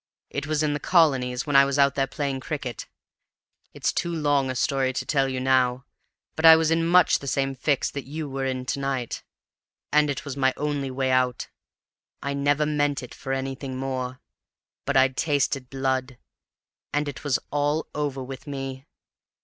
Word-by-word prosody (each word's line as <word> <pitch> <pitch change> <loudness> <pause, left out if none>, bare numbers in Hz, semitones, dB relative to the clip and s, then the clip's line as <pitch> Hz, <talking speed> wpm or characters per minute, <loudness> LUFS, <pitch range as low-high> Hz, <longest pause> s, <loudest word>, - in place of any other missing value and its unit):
"It 140 0 -3
was 155 0 0
in 150 -1 +1
the 145 - -2
Colonies, 135 -8 +2
when 145 -2 -1
I 140 - +9
was 140 0 0
out 140 -1 +4
there 135 -1 0
playing 140 -1 -3
cricket. 135 -5 -5 0.8
It's - - -1
too 175 - -1
long 145 -4 +1
a 130 - -3
story 130 0 +1
to - - -3
tell 135 -3 +1
you 130 -1 -2
now, 130 0 +2 0.5
but 160 - -4
I 160 0 +11
was 160 0 +2
in 165 0 +2
much 175 -1 +5
the 140 - -9
same 135 +1 0
fix 135 +1 0
that 140 -2 -6
you 155 +2 -4
were 135 0 -4
in 130 -1 -3
to 140 - -2
night, 135 -3 -2 0.7
and 150 0 +4
it 140 0 -3
was 140 -2 -5
my 130 -2 +2
only 145 -2 -2
way 130 0 -1
out. 130 -1 +1 0.7
I 140 +1 -3
never 145 +1 +2
meant 145 -2 0
it 125 - -9
for 135 - -6
anything 135 0 -3
more; 130 -1 -3 0.7
but 140 -1 +1
I'd 130 0 +4
tasted 140 -4 0
blood, 130 -1 -2 0.7
and 150 0 0
it 145 - -6
was 145 -3 +2
all 145 +2 0
over 140 -3 -2
with 135 +1 -9
me. 135 -1 -6
135 Hz, 185 wpm, -25 LUFS, 130-145 Hz, 0.8 s, I